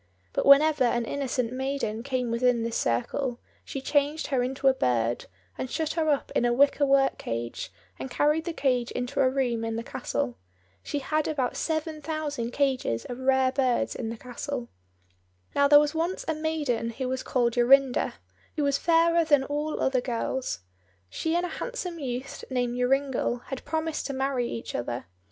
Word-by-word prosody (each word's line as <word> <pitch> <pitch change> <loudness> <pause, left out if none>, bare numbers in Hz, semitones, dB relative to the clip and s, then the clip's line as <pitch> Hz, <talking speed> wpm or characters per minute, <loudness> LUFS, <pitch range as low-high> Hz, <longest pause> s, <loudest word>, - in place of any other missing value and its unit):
But - - 0
whenever 290 0 +7
an 240 -1 +1
innocent 250 -3 -2
maiden 265 -4 -2
came 250 -2 -2
within 235 0 +2
this 230 0 -2
circle, 235 - -1 0.2
she 275 - -5
changed 290 +3 +1
her 255 - +3
into 265 +2 -1
a 265 - +7
bird, 120 - 0 0.3
and 260 - -3
shut 315 +3 -1
her 320 -2 +1
up 285 -2 0
in - - +3
a 240 - +3
wicker 280 +3 +4
work 270 0 +3
cage, 115 -2 -4 0.3
and 130 0 -5
carried 300 +2 +2
the 345 - -2
cage 255 -6 0
into 250 +3 -3
a 260 - +5
room 250 -4 0
in 225 0 -2
the 230 - -3
castle. 120 - -3 0.4
She 290 - -3
had 305 +2 0
about 270 -5 -1
seven 315 -1 -2
thousand 295 -6 -3
cages 255 - 0
of 245 - -6
rare 260 0 +3
birds 255 -2 +1
in 225 - -4
the 230 - -5
castle. 250 +1 -5 0.8
Now, 280 0 +4
there 290 +1 +8
was 295 0 +1
once 335 +4 -2
a 320 - +1
maiden 305 -7 -1
who 255 +3 -4
was 260 0 -2
called 240 -2 +1
Jorinda, 255 +2 +4 0.4
who 300 - 0
was 280 -1 +2
fairer 335 0 +4
than 290 -4 +4
all 295 +2 -2
other 260 -2 +2
girls. 245 - -2 0.5
She 320 +1 -1
and 350 +1 +1
a - - -4
handsome 360 -9 -4
youth 255 -2 -5
named 245 -2 -1
Joringel 250 -1 0
had 270 - -5
promised 315 +1 -2
to 280 - -4
marry 265 -2 0
each 230 - -5
other. 120 0 -3
265 Hz, 180 wpm, -27 LUFS, 245-295 Hz, 0.8 s, there